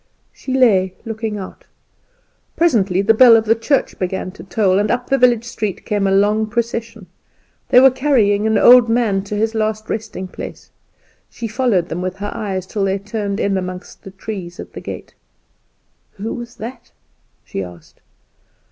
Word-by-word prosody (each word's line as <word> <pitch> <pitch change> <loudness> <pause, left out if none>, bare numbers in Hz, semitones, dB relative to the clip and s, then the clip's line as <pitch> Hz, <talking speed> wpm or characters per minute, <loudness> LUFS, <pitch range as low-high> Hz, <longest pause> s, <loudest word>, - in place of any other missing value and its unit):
She 260 - -7
lay 190 -8 +3
looking 220 -1 -4
out. 190 -2 -9 0.9
Presently 200 - +2
the 225 +2 +4
bell 235 0 +8
of 220 - 0
the 225 - +4
church 230 +5 -1
began 185 0 -3
to 200 - -12
toll, 190 0 +1
and 205 +1 0
up 245 +1 -2
the 275 - +4
village 240 -2 +4
street 215 -5 -4
came 205 -2 0
a - - +1
long 210 +2 +2
procession. 230 -2 -3 0.6
They 250 - +7
were 265 +1 +7
carrying 220 -7 +2
an 220 - +2
old 245 -1 +7
man 225 -5 +1
to 210 - -4
his 220 +2 0
last 215 0 -2
resting 215 -4 -4
place. - - -9 0.6
She 230 - -6
followed 215 -6 0
them 170 +3 -4
with 185 0 -3
her 205 +1 -4
eyes 195 -5 -3
till 200 +1 -3
they 195 0 +1
turned 205 0 -4
in 195 -1 0
among 180 0 -5 0.2
the - - -10
trees 190 -3 -7
at - - -9
the - - -8
gate. - - -8 1.0
"Who 215 +3 -5
was 240 0 -8
that?" 235 +2 -9 0.5
she 95 - -5
asked. 90 -3 -11
215 Hz, 175 wpm, -18 LUFS, 195-230 Hz, 1.0 s, bell